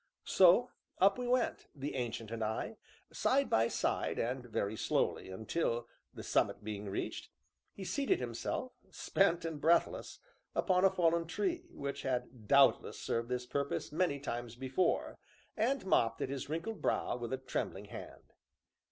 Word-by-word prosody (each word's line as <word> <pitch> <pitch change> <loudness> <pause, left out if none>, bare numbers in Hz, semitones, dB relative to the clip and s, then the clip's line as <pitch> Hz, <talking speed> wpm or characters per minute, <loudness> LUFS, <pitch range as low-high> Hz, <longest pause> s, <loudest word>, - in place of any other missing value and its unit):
So 190 +7 +6 0.3
up 195 +5 +4
we 250 - -2
went, 250 0 +1
the 140 +1 -4
Ancient 115 -3 -3
and 115 -1 -2
I, 110 - -2 0.4
side 275 +1 +2
by 115 +1 +4
side, - - -1
and 125 +2 -1
very 110 -3 -2
slowly, 105 - 0
until, 115 - -1 0.2
the - - -9
summit - - +1
being 105 -1 -5
reached, 95 - -4 0.4
he 195 - -8
seated 285 - +1
himself, 255 -8 -3 0.2
spent 175 -3 +1
and 160 -3 -4
breathless, 170 +2 +2 0.4
upon 185 0 +3
a - - +7
fallen 170 -3 +2
tree, 350 - -2
which 140 0 -4
had 125 -4 -3
doubtless 140 +4 +5
served 115 +1 -2
this 125 0 -2
purpose 140 +2 -2
many 155 -3 +1
times 120 -4 -4
before, 130 +7 0 0.4
and 245 +2 +1
mopped 115 -11 +2
at - - -2
his 140 0 -4
wrinkled 170 +8 -3
brow - - +1
with 120 0 -5
a 130 - 0
trembling 130 - -3
hand. - - -10
140 Hz, 150 wpm, -34 LUFS, 120-190 Hz, 0.4 s, a